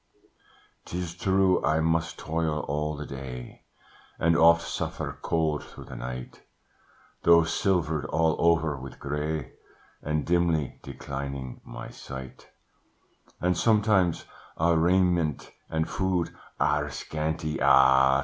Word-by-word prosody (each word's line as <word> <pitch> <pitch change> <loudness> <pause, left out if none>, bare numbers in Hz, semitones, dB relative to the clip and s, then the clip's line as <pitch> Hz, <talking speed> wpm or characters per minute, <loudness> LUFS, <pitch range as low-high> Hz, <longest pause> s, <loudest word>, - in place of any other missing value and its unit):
"'Tis 90 -1 -4
true, 95 +1 +2
I 75 +2 +2
must 80 0 0
toil 80 -1 -1
all 75 +2 -1
the 75 - -5
day, 65 -3 -8 0.5
And 85 0 +3
oft 85 0 +6
suffer - - -4
cold 80 -2 0
through - - -12
the - - -10
night, 60 0 -7 0.8
Though 85 0 +6
silvered 80 -3 0
all 80 -1 +1
over 80 -3 +3
with 65 -1 -9
grey, 75 0 -3 0.5
And 75 -1 -1
dimly 85 -5 +1
declining 70 -2 -6
my - - -8
sight: 65 -1 -9 0.9
And 90 0 +1
sometimes 105 -3 +2 0.3
our 85 +1 +3
raiment 85 -2 +2 0.2
and 80 0 -1
food 95 -3 -1 0.3
Are - - +1
scanty 80 0 -3
ah! 65 0 +6
80 Hz, 115 wpm, -27 LUFS, 70-85 Hz, 0.9 s, oft